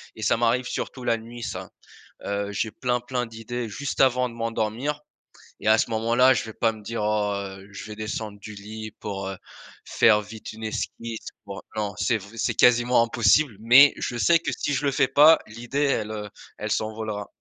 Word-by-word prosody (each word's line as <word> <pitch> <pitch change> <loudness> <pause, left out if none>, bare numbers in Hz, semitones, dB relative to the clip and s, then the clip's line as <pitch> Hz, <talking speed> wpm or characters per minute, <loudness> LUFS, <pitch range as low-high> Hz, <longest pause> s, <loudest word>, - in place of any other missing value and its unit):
et - - -10
ça - - +2
m'arrive 120 +2 +1
surtout 130 - -5
la 115 -1 +1
nuit 120 +2 -10
ça. - - -5 0.6
Heu, 100 0 -2
j'ai 110 +2 -1
plein, 125 -1 -1
plein 125 0 -3
d'idées 115 +1 -5
juste 145 +6 -4
avant 125 -1 +4
de 115 - -11
m'endormir 115 +5 -2 0.6
et - - 0
à 110 - +7
ce 115 - 0
moment-là, 115 +4 +4
je - - -1
vais 110 - -9
pas 115 -1 +1
me 110 -1 -12
dire: 115 +1 -4
«Oh, 105 -1 +1
heu, 95 0 -7
je 100 - -8
vais 105 - -7
descendre 110 -1 -5
du 105 +2 -9
lit 110 +2 -8
pour, 95 -2 -4
heu, 95 - -5 0.5
faire 105 -2 +4
vite 110 +1 -9
une 110 +1 -9
esquisse, 115 +1 -5 0.2
pour» 100 -1 -8
non, 105 -2 -2
c'est 100 +4 +1
vr 100 0 -13
c'est - - 0
quasiment 120 0 +5
impossible, 115 +2 +3
mais 130 +5 +7
je 120 - -3
sais 170 +6 +5
que - - -2
si 145 - -2
je 135 - -2
le 140 - +2
fais 135 0 +2
pas 155 +3 +7
l'idée 120 +6 -3 0.2
elle, 105 0 -6
heu, 105 -1 -6 0.3
elle 105 0 -4
s'envolera. 110 -2 -3
115 Hz, 205 wpm, -25 LUFS, 105-125 Hz, 0.6 s, à